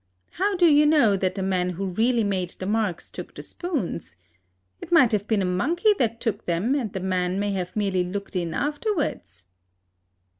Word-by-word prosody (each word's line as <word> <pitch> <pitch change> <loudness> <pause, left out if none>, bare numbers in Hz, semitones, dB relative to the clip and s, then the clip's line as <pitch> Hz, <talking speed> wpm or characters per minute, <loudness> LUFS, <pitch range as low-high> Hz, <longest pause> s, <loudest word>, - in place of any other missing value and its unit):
How 395 +3 0
do 355 -1 +4
you 300 -2 +6
know 285 -10 +4
that 185 -1 -1
the 195 - -2
man 185 -1 0
who 180 +2 -4
really 225 +5 +1
made 190 -3 -1
the 185 - -5
marks 210 -4 -1
took - - -9
the - - -8
spoons? 255 - -4 0.7
It - - -9
might 260 -9 +6
have 210 -1 0
been 210 -4 +1
a - - 0
monkey 325 - +2
that 230 -2 0
took 225 -3 -3
them, 175 +9 +1
and 250 -8 -1
the 190 - -4
man 185 0 -1
may 205 0 0
have 185 -2 -4
merely 195 -4 +1
looked 195 +2 -5
in 170 -3 -2
afterwards." 295 - -2
205 Hz, 190 wpm, -24 LUFS, 185-275 Hz, 0.7 s, you